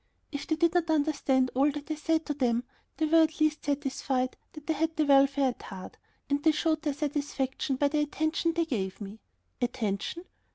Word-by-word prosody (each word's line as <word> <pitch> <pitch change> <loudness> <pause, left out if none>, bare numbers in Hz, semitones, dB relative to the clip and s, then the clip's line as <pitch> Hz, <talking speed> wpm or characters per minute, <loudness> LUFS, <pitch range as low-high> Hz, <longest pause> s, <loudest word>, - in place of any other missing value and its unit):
If 285 -2 -5
they 315 - +1
did 335 +1 +2
not 345 -2 +1
understand 285 -4 +2
all 275 +3 +3
that 295 +2 -6
I - - +2
said 320 +1 0
to 295 - -1
them, 245 -4 +1 0.3
they 315 - +1
were 325 +1 +5
at 315 0 +1
least 310 0 +1
satisfied 270 -2 -1 0.2
that 305 -1 -11
I 320 - +2
had 320 +2 -1
their 310 - +2
welfare 275 -1 +4
at 245 - -7
heart, 190 -2 -9 0.3
and 285 0 0
they 315 +1 +4
showed 315 0 +1
their 295 -2 -1
satisfaction 285 -2 -2
by 285 +2 +2
the 300 +1 0
attention 315 +3 0
they 335 0 +1
gave 195 - -3
me. 205 +1 -8 0.4
Attention? 240 - -2
290 Hz, 200 wpm, -29 LUFS, 265-315 Hz, 0.4 s, were